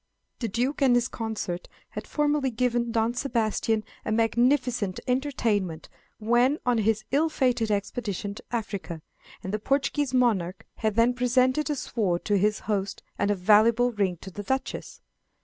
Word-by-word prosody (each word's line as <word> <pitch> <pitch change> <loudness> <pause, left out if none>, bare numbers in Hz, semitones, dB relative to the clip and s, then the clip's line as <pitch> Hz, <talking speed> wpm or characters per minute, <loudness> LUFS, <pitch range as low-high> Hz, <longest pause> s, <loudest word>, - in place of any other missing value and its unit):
The 235 - -1
Duke 245 +8 -1
and 260 -3 +5
his 245 0 +2
consort 210 -7 -4 0.2
had - - -7
formerly 295 -2 +1
given 240 0 0
Don 225 +1 +1
Sebastian 225 -3 0 0.2
a - - -3
magnificent 235 -2 +1
entertainment 230 - -1 0.3
when 240 +6 +3
on 245 -2 +2
his 215 0 +1
ill 305 +4 +3
fated 250 -6 +1
expedition 205 -1 -2
to - - -11
Africa, 200 -8 -4 0.4
and 190 - -5
the 215 - 0
Portuguese 275 +3 0
monarch 215 -8 +1
had 215 -2 -1
then 230 +2 +4
presented 255 +4 +2
a 295 - 0
sword 200 -9 -1
to 205 - +2
his 210 +2 +1
host 200 -2 -2 0.2
and 200 - +1
a 205 - +2
valuable 220 +6 +4
ring 195 -5 0
to 190 - -9
the 205 - -6
Duchess. 265 +6 -3
230 Hz, 155 wpm, -26 LUFS, 205-250 Hz, 0.4 s, and